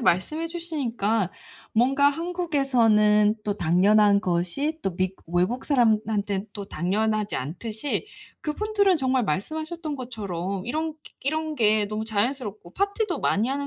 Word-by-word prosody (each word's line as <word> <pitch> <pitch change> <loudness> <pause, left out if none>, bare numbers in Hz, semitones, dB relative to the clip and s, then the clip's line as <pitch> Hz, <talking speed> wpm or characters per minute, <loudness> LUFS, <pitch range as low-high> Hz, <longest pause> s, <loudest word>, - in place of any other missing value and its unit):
말씀해 250 - +1
주시니까 240 - -1 0.4
뭔가 270 +5 +4
한국에서는 255 -11 +3
또 205 -1 -2
당연한 200 +4 +4
것이 185 - -1
또 195 - -2
미국 185 0 -2
외국 210 +9 +1
사람한테는 215 -6 +1
또 200 -1 -6
당연하지 210 +5 0
않듯이 220 - -3 0.4
그분들은 405 +3 +2
정말 260 -3 +1
말씀하셨던 310 - -3
것처럼 200 -6 -4
이런 315 +5 -2 0.3
이런 310 +2 -1
게 215 -4 +3
너무 215 +1 -3
자연스럽고 215 -3 -2
파티도 400 - 0
많이 215 +5 +1
하는 280 +1 -2
225 Hz, 310 characters per minute, -25 LUFS, 205-300 Hz, 0.4 s, 뭔가